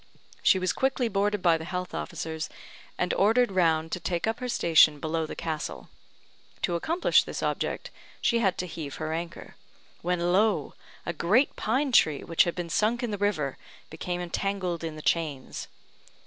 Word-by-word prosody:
She - - +5
was 185 -1 0
quickly 265 -2 +1
boarded 205 -1 0
by 165 -2 +4
the - - -6
health 180 +2 -4
officers, 160 -2 -4 0.5
and 180 - 0
ordered 225 +3 +3
round 165 -3 +2
to 180 - -2
take 175 0 -1
up 225 0 -1
her 250 -1 -4
station 160 -7 +5
below 160 +1 -1
the - - -6
castle. 160 -2 -4 0.7
To 175 - +1
accomplish 325 - +3
this - - -5
object - - -2 0.3
she 235 - +2
had 195 -5 +1
to 180 - -2
heave 155 -5 -6
her 155 0 -3
anchor; 170 +1 -6 0.4
when 175 0 0
lo! 210 +2 +2 0.3
a 170 - -2
great 205 - +2
pine 265 +5 0
tree, 155 - +4
which 165 - +3
had 170 - -2
been 175 -2 -4
sunk 230 +7 +1
in 235 - -1
the 205 - -3
river, 155 -10 0 0.3
became 175 +2 -3
entangled 180 -1 -2
in 160 -1 -4
the 155 - -9
chains. 150 -6 -1
175 Hz, 175 wpm, -27 LUFS, 160-205 Hz, 0.7 s, She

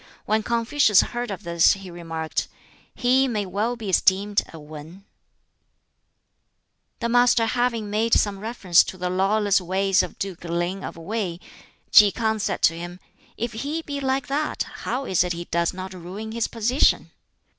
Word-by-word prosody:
When 215 +1 +1
Confucius 230 -1 +3
heard 240 -1 -4
of 195 -3 -6
this 170 -1 +4
he 195 -2 -9
remarked, 165 -2 -4 0.5
"He 260 +2 +3
may 215 -5 -2
well 210 +6 -2
be 225 -3 -8
esteemed 195 +2 +2
a 165 - -10
'Wan,'" 155 +5 -11 2.0
The 235 - 0
Master 245 -1 +4
having 230 -3 -1
made 225 +2 +2
some 200 -2 +1
reference 200 -5 +3
to 185 - -7
the 180 0 -2
lawless 200 +1 +2
ways 190 +1 +2
of - - -6
Duke 190 -4 -5
Ling 175 +3 -2
of - - -7
Wei, 180 0 -4 0.5
Ki 205 -1 +8
K'ang 220 0 -1
said - - -2
to 165 - +5
him, 175 +1 -8 0.4
"If 235 0 -3
he 290 +8 -4
be 285 -2 -5
like 265 0 -1
that, 295 +3 -2 0.2
how 270 +2 -2
is 185 -5 +2
it 180 -1 -2
he 170 +1 -6
does 170 0 0
not 185 +1 -7
ruin 185 +5 -7
his 230 0 -1
position?" 240 +4 +1
205 Hz, 165 wpm, -23 LUFS, 180-235 Hz, 2.0 s, Ki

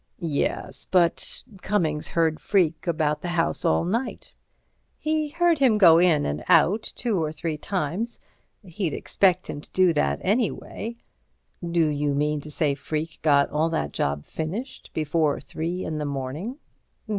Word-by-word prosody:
"Yes... 160 -6 -2
But 175 -3 +1 0.2
Cummings 160 -7 0
heard 160 -2 +1
Freke 175 -4 +1
about 155 -3 0
the - - -4
house 165 - 0
all 80 - +2
night." 230 +8 -3 0.6
"He 310 -1 -1
heard 340 0 +2
him 250 -6 +4
go 170 -5 +7
in 170 -4 +4
and 75 +1 -3
out 205 +6 +5
two 220 -7 -2
or 155 -1 -1
three 160 0 -3
times. 190 +7 -3 0.4
He'd 175 -3 -3
expect 185 -2 +2
him 145 - -5
to - - -16
do 185 -2 +3
that, 150 - +1
anyway." 225 +2 -1 0.7
"Do 170 -1 +2
you 145 -1 0
mean 150 +1 0
to 150 - -10
say 150 -1 +1
Freke 155 +3 -4
got 140 -2 +3
all 155 +2 +1
that 75 - -2
job 70 +1 -1
finished 195 +12 -5
before 155 -1 +1
three 165 +6 -4
in 155 -1 -3
the 150 - -2
morning?" 145 - -4
165 Hz, 155 wpm, -25 LUFS, 150-195 Hz, 0.7 s, go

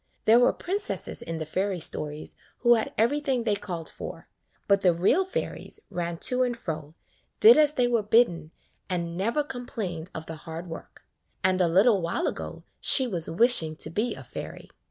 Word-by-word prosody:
There 225 +2 +6
were 245 - +4
princesses 400 +3 -3
in 165 0 -5
the 160 - -4
fairy 190 +4 -2
stories 150 -1 -3 0.3
who 240 -1 +5
had 225 - 0
everything 265 +1 +1
they 215 -2 +1
called 175 -5 -6
for, - - -8 0.4
but 200 -1 +3
the 180 -3 +3
real 255 - +2
fairies 380 - -5
ran 170 -1 -3
to 255 0 +1
and 245 -2 0
fro, 155 -6 -6 0.4
did 445 +2 +8
as 300 -1 +4
they 245 -1 +2
were 235 -2 +1
bidden, 210 -7 +2 0.4
and 170 -2 -3
never 230 +11 0
complained 210 - -6
of 160 - -6
the 160 0 -8
hard 165 +2 -8
work: 165 - -11 0.4
and 185 0 +2
a 175 - +3
little 195 +4 +4
while 170 - -2
ago - - -5 0.2
she 265 - +7
was 175 -9 +1
wishing 170 -5 +4
to - - -5
be 215 +8 -1
a - - -10
fairy. - - -9
195 Hz, 180 wpm, -26 LUFS, 165-245 Hz, 0.4 s, did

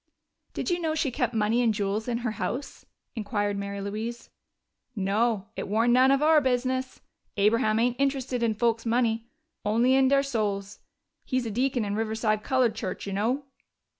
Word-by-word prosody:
"Did - - -2
you 350 - +1
know 320 -2 -1
she 295 -4 0
kept 245 -2 -1
money 220 +2 +2
and 235 -2 +3
jewels 205 +2 -2
in 240 -1 0
her 240 - 0
house?" 255 +5 -5 0.3
inquired 205 -2 -1
Mary 200 0 -4
Louise. 220 +4 -5 0.6
"No. 210 +1 0
It - - -4
warn't 225 +4 +2
none 255 +1 +5
of 275 +2 +3
our 310 0 +5
business. 260 0 -1 0.4
Abraham 215 +2 +3
ain't 240 +2 +1
interested 265 -3 0
in 225 -2 +1
folks' 230 +1 +1
money 230 -1 0 0.3
only 230 +5 +3
in 265 0 +5
der 275 +1 +4
souls. 205 -6 -2 0.4
He's 255 -2 -1
a 225 - -3
deacon 250 0 0
in 200 - -2
Rive'side 220 0 0
Colored 255 -2 +2
Church, 195 -4 -5
you 200 - -4
know!" 235 +8 0
230 Hz, 170 wpm, -27 LUFS, 210-255 Hz, 0.6 s, none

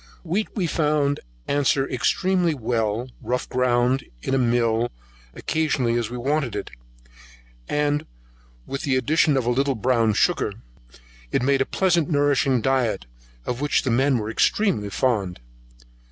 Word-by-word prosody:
Wheat 185 +6 -1
we 195 -5 0
found 150 -3 +1 0.3
answer 140 -1 +2
extremely 180 -4 +1
well, 115 -1 -1
rough 125 0 -2
ground 125 +1 +1 0.2
in - - -2
a 135 - +3
mill 120 -1 +2 0.5
occasionally 145 -7 0
as 120 -2 -1
we 125 - -5
wanted 135 -1 -1
it, - - -5 1.0
and 145 0 0 0.6
with 135 - -4
the 135 -2 0
addition 145 +3 +2
of 130 - 0
a 120 - +2
little 135 +2 +1
brown 115 -1 +2
sugar, 170 - +1 0.8
it - - +1
made 135 0 +2
a - - +1
pleasant 175 -4 +1
nourishing 145 -4 +2
diet, 125 - 0 0.4
of 125 +2 -3
which 145 - +1
the 130 - 0
men 130 +2 +3
were 110 -1 -3
extremely 115 - +1
fond. 100 -6 0
130 Hz, 140 wpm, -23 LUFS, 120-145 Hz, 1.0 s, a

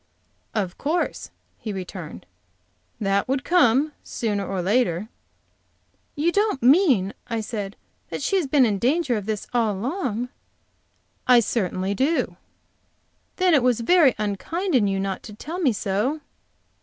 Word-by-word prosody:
"Of 190 -5 -2
course," 325 +4 -1 0.3
he 220 - -5
returned, 180 - -7 0.7
"that 200 -1 +1
would 265 +1 0
come, 300 -4 +3
sooner 205 -4 -2
or 195 0 -3
later." 200 0 +1 1.1
"You 315 +4 +1
don't 410 - +1
mean," 255 - +4
I 230 -1 -2
said, 205 -2 -5 0.3
"that - - -5
she 390 - +1
has 345 -7 0
been 270 -1 +4
in 205 -4 0
danger 270 - +1
of 210 -2 -4
this 215 -2 -2
all 230 -3 +2
along?" 245 - -2 1.0
"I 250 -1 +7
certainly 195 -4 -1
do." 275 +10 0 1.0
"Then 365 -2 +3
it 285 - +5
was 245 -2 +2
very 305 0 +5
unkind 215 - -2
in 230 -6 +4
you 195 0 0
not 195 -1 -2
to 210 - -10
tell 325 - -6
me 295 -8 +3
so." 215 +9 -1
235 Hz, 145 wpm, -24 LUFS, 200-290 Hz, 1.1 s, I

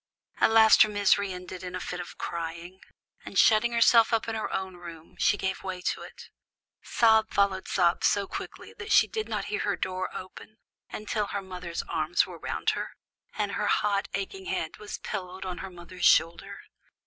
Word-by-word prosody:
At - - +5
last 220 -1 +7
her 215 - +7
misery 200 -1 +2
ended 180 0 -8
in 180 0 -6
a - - -3
fit 180 0 -5
of 175 - -8
crying, 170 +2 -6 0.4
and 195 - -7
shutting 225 +4 +5
herself 230 0 +5
up 225 -1 +1
in 225 - -2
her 220 -1 -3
own 190 -1 -4
room, 170 -2 -11
she 205 - +3
gave 190 -1 -2
way 185 -1 -5
to 180 - -2
it. - - -12 0.5
Sob 220 -1 +3
followed 195 -1 +1
sob 175 -2 +2
so 200 -1 +2
quickly - - -8
that 440 0 -6
she - - +7
did 440 -1 -4
not - - -2
hear 415 - 0
her - - 0
door 185 0 -3
open, 200 +3 -10 0.3
until 210 -1 -3
her 200 - -3
mother's 180 -2 -6
arms 160 +2 +1
were 180 -3 -10
round - - -1
her, - - -5 0.4
and - - -1
her - - -1
hot, 200 -1 +1
aching 375 - -5
head 385 - -3
was 210 - -7
pillowed 190 -2 -6
on 180 -2 -5
her 195 - -6
mother's 175 0 -6
shoulder. 195 +4 +2
190 Hz, 190 wpm, -27 LUFS, 180-215 Hz, 0.5 s, last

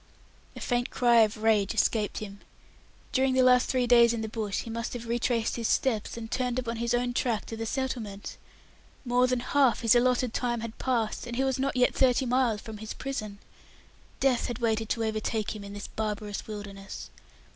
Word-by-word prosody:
A - - -7
faint 245 -1 -1
cry 240 -2 +3
of 215 -1 +2
rage 215 -2 +3
escaped 215 -1 +1
him. 200 -2 -7 0.7
During 260 0 +2
the 260 - +5
last 250 0 +5
three 255 -1 +2
days 235 -1 +6
in 230 - -2
the 220 - -3
bush 215 -3 -3
he - - -8
must 230 0 -4
have 240 -1 -6
retraced 235 0 0
his 230 -2 -1
steps, 230 -4 0
and 230 - -5
returned 250 +2 -2
upon 235 -2 -2
his 235 +1 0
own 245 0 0
track 235 -3 0
to 225 - -6
the 225 0 -4
settlement! 225 -6 -4 0.7
More 250 +1 +3
than 250 -1 0
half 265 -1 +2
his 230 -1 +5
allotted 250 -1 +2
time 240 -2 -1
had 230 -1 -7
passed, 240 -2 -1
and 240 - -5
he 265 - +1
was 265 -1 0
not 275 +1 0
yet 250 - +4
thirty 260 0 +3
miles 245 -4 +1
from 220 -1 -8
his 220 0 -6
prison. 215 -7 -5 0.8
Death 265 -3 +2
had 240 - -4
waited 225 -2 0
to 230 - 0
overtake 220 0 -2
him 210 - -8
in 200 0 -8
this 205 0 -6
barbarous 210 -1 -4
wilderness. 200 -2 -8
235 Hz, 200 wpm, -28 LUFS, 220-250 Hz, 0.8 s, days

